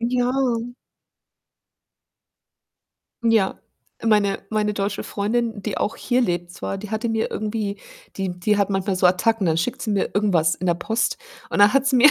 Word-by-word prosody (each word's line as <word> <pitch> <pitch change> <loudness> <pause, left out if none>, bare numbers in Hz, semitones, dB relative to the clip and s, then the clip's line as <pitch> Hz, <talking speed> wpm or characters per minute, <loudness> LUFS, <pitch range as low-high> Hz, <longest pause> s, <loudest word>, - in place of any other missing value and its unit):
Ja. 245 +1 +1 2.9
Ja, 225 -4 +2 0.4
meine 210 -3 +2
meine 210 -1 0
deutsche 200 0 -2
Freundin, 220 0 -2
die 210 - -3
auch 215 - -1
hier 245 0 +1
lebt 175 -5 -1
zwar, 195 - -4
die 205 +1 -8
hatte 220 +2 -1
mir 225 0 -1
irgendwie 210 -1 -3 0.4
die 185 -2 -3
die 210 +3 +1
hat 200 - +2
manchmal 195 0 0
so 185 - +4
Attacken, 200 +2 +2
dann 160 -1 +2
schickt 170 +9 -1
sie 215 - -2
mir 200 - 0
irgendwas 175 -6 +2
in 185 - -5
der 170 - +3
Post 225 +6 -1 0.3
und - - -2
dann 205 0 +7
hat 275 0 +3
sie 265 -2 +3
mir 290 +5 +8
210 Hz, 170 wpm, -22 LUFS, 190-225 Hz, 2.9 s, mir